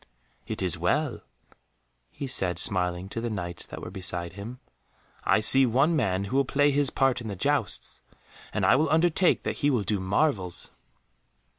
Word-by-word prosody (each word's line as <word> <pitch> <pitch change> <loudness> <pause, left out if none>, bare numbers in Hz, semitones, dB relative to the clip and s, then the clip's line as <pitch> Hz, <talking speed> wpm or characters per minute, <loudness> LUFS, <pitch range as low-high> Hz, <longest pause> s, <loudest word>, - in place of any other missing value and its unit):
"It - - -3
is 85 -2 -1
well," 140 - 0 0.9
he 140 - -7
said, 95 -9 +1
smiling 90 -2 0
to 115 - -5
the 120 - -3
Knights 85 -5 -5
that - - -9
were 90 - -7
beside 90 -3 -1
him, 110 +6 -8 0.7
"I - - +3
see 130 +4 +5
one 135 +8 +2
man 100 -9 0
who 115 +7 -2
will 140 - +4
play 145 +2 +2
his 140 -1 +2
part 135 -2 +1
in 115 - -7
the 100 - -4
jousts, - - -1 0.5
and 105 - -1
I 105 - +5
will 150 +2 +1
undertake 170 +3 +3
that - - -3
he 145 - +1
will 125 -7 +1
do 105 0 -1
marvels." 95 - -1
110 Hz, 175 wpm, -26 LUFS, 95-140 Hz, 0.9 s, see